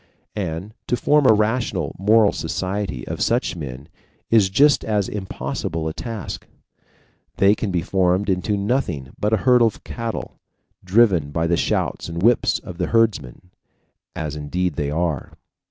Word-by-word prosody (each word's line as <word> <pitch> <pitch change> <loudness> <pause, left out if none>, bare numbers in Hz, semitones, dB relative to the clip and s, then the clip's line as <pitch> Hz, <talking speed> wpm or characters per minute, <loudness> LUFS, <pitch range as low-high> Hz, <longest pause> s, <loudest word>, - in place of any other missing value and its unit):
And 95 +1 -4
to 125 - +1
form 150 0 +3
a - - +8
rational 105 - 0
moral 105 +1 +5
society 95 -9 -3
of - - -5
such - - +1
men 70 -3 -7 0.4
is 110 -4 +5
just 145 +9 +4
as 105 -3 0
impossible 85 -4 -4
a 80 - -3
task. 115 -1 -6 0.9
They 100 +1 +5
can 105 -1 -3
be 90 -3 -1
formed 95 +2 +1
into 95 +2 0
nothing 100 - -1
but 105 - 0
a 110 - +4
herd 125 -1 +6
of 115 -3 +1
cattle, 115 -2 -5 0.4
driven 95 -6 +3
by 80 +3 -1
the 85 +1 +2
shouts - - -1
and 85 +2 -4
whips 120 +2 +3
of 90 0 -10
the 90 - 0
herdsmen. 95 - 0 0.6
As 75 -2 -4
indeed 85 +4 -2
they 70 0 -2
are. 80 -2 -2
95 Hz, 155 wpm, -22 LUFS, 80-110 Hz, 0.9 s, a